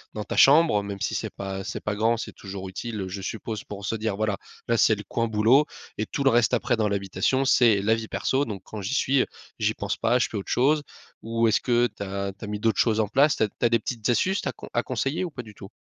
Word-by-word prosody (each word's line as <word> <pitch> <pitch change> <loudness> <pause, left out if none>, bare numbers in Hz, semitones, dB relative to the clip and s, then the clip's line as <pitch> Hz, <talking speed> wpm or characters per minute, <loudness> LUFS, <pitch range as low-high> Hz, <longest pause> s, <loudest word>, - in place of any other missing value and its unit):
dans 105 - -3
ta - - -5
chambre 145 -6 +6
même 100 -1 -6
si - - -1
c'est - - -2
pas 95 0 -5
c'est - - -5
pas 105 - -2
grand 115 +2 +2
c'est - - -5
toujours 95 -1 -7
utile, 105 +3 -5
heu, 95 - -4
je 95 +1 -6
suppose 110 +2 -5
pour 100 -1 -8
se 105 - -1
dire: 110 -2 -2
«Voilà, 105 -2 0 0.3
là 115 - +2
c'est 110 -1 +4
le 105 - -8
coin 115 0 -1
boulot 115 +7 +4 0.3
et 110 - -1
tout 140 - -2
le 135 - +5
reste 120 +1 +3
après 120 0 0
dans 110 -1 +1
l'habitation 100 +7 0
c'est 115 -5 +5
la 110 +2 +3
vie 115 0 -3
perso. 135 +5 0
Donc 100 -4 -6
quand 110 - -7
j'y 100 +8 -2
suis, 135 0 +3
heu, - - -1 0.3
j'y - - +1
pense - - -3
pas 125 - +2
je 125 - +1
fais 110 - -4
autre 100 - -5
chose». 145 +5 +3 0.4
Ou 115 0 +1
est-ce 110 - +2
que 120 -1 +3
tu - - -12
as 100 0 -3
tu 95 - -15
as - - -8
mis 105 0 -4
d'autres 115 +1 +1
choses 110 -2 +3
en 110 - +2
place? 140 +7 +3
Tu - - +1
as 105 - +1
tu 120 - -3
as - - +5
des 115 - +4
petites 115 -1 -4
astuces 185 +11 +2
ta - - -2 0.2
à 120 - +2
conseiller 135 +7 -2
ou - - -4
pas 125 -4 -7
du 110 -2 -13
tout? 95 -1 -11
110 Hz, 280 wpm, -25 LUFS, 100-120 Hz, 0.4 s, chambre